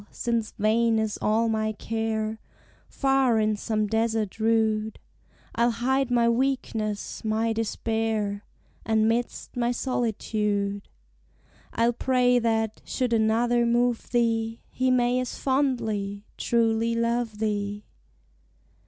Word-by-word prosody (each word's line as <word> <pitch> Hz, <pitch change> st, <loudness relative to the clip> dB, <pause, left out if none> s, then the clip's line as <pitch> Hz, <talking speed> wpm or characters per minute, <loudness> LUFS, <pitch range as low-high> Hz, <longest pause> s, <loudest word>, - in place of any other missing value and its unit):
since 230 Hz, -2 st, -2 dB
vain 225 Hz, +2 st, +2 dB
is 220 Hz, -1 st, -1 dB
all 225 Hz, +2 st, +2 dB
my 215 Hz, -1 st, 0 dB
care, 220 Hz, 0 st, -2 dB, 0.5 s
Far, 270 Hz, -4 st, +2 dB
in 215 Hz, 0 st, +2 dB
some 215 Hz, 0 st, -1 dB
desert 220 Hz, -1 st, -1 dB
rude, 220 Hz, -1 st, +1 dB, 0.6 s
I'll 235 Hz, +1 st, +2 dB
hide 255 Hz, +3 st, 0 dB
my 240 Hz, -1 st, +3 dB
weakness, 235 Hz, -4 st, -1 dB
my 220 Hz, +1 st, 0 dB
despair: 220 Hz, -2 st, -1 dB, 0.4 s
And, 220 Hz, -1 st, +2 dB
'midst 235 Hz, +2 st, -2 dB
my 240 Hz, -1 st, +1 dB
solitude, 210 Hz, -5 st, -1 dB, 0.8 s
I'll 235 Hz, +1 st, +2 dB
pray, 250 Hz, 0 st, +2 dB
that, 225 Hz, -2 st, 0 dB
should 250 Hz, -2 st, -1 dB
another 230 Hz, +2 st, +2 dB
move 240 Hz, 0 st, +1 dB
thee, 230 Hz, -1 st, 0 dB
He 255 Hz, 0 st, 0 dB
may 250 Hz, 0 st, +2 dB
as 255 Hz, -1 st, -4 dB
fondly, 220 Hz, -7 st, -1 dB
truly 230 Hz, 0 st, +1 dB
love 230 Hz, -1 st, -1 dB
thee. 205 Hz, -1 st, -2 dB
225 Hz, 110 wpm, -26 LUFS, 215-240 Hz, 0.8 s, my